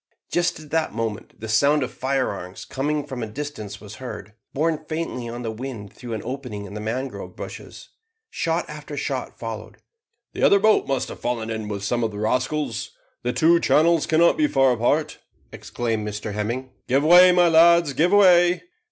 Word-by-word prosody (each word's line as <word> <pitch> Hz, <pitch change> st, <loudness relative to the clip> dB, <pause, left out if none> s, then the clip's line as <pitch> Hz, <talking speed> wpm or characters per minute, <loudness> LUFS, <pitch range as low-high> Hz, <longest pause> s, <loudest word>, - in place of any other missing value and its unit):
Just 175 Hz, -3 st, 0 dB
at 155 Hz, -2 st, -13 dB
that 160 Hz, -8 st, 0 dB
moment 115 Hz, -2 st, -4 dB
the 110 Hz, -, -6 dB
sound 140 Hz, +7 st, +3 dB
of 130 Hz, -, -4 dB
firearms 125 Hz, -9 st, -3 dB
coming 145 Hz, +2 st, -2 dB
from 130 Hz, -3 st, -6 dB
a 110 Hz, -, -3 dB
distance 110 Hz, -5 st, -7 dB
was 105 Hz, 0 st, -11 dB
heard, 105 Hz, -5 st, -8 dB, 0.2 s
borne 155 Hz, +2 st, -1 dB
faintly 155 Hz, -7 st, -4 dB
on 120 Hz, +1 st, -6 dB
the 115 Hz, -, -3 dB
wind 110 Hz, -3 st, -7 dB
through 120 Hz, -2 st, -8 dB
an 110 Hz, -, -4 dB
opening 125 Hz, -5 st, -5 dB
in 100 Hz, -, -10 dB
the 105 Hz, -, -5 dB
mangrove 125 Hz, +5 st, -5 dB
bushes. -, -, -9 dB, 0.4 s
Shot -, -, -1 dB
after -, -, -8 dB
shot -, -, -3 dB
followed. -, -, -7 dB, 0.6 s
"The -, -, -5 dB
other 200 Hz, -, +6 dB
boat 215 Hz, +1 st, +3 dB
must 135 Hz, -2 st, -1 dB
have -, -, -9 dB
fallen 115 Hz, -2 st, -2 dB
in 110 Hz, -1 st, -4 dB
with 100 Hz, -1 st, -5 dB
some 120 Hz, +3 st, 0 dB
of 115 Hz, -, +1 dB
the 105 Hz, -, -9 dB
rascals; 125 Hz, +2 st, -2 dB, 0.2 s
the 125 Hz, -, -1 dB
two 165 Hz, +5 st, +4 dB
channels 165 Hz, 0 st, +3 dB
cannot 165 Hz, +2 st, +4 dB
be 305 Hz, -1 st, +3 dB
far 135 Hz, -, +3 dB
apart," 145 Hz, +6 st, 0 dB, 0.3 s
exclaimed 110 Hz, -3 st, -3 dB
Mr 105 Hz, 0 st, -5 dB
Hemming. 120 Hz, +5 st, -3 dB, 0.2 s
"Give 135 Hz, +3 st, +2 dB
way, 180 Hz, +3 st, +8 dB
my 175 Hz, -1 st, +4 dB
lads, 170 Hz, -2 st, +5 dB
give 160 Hz, +7 st, +2 dB
way." 180 Hz, -3 st, +5 dB
130 Hz, 185 wpm, -23 LUFS, 110-155 Hz, 0.6 s, way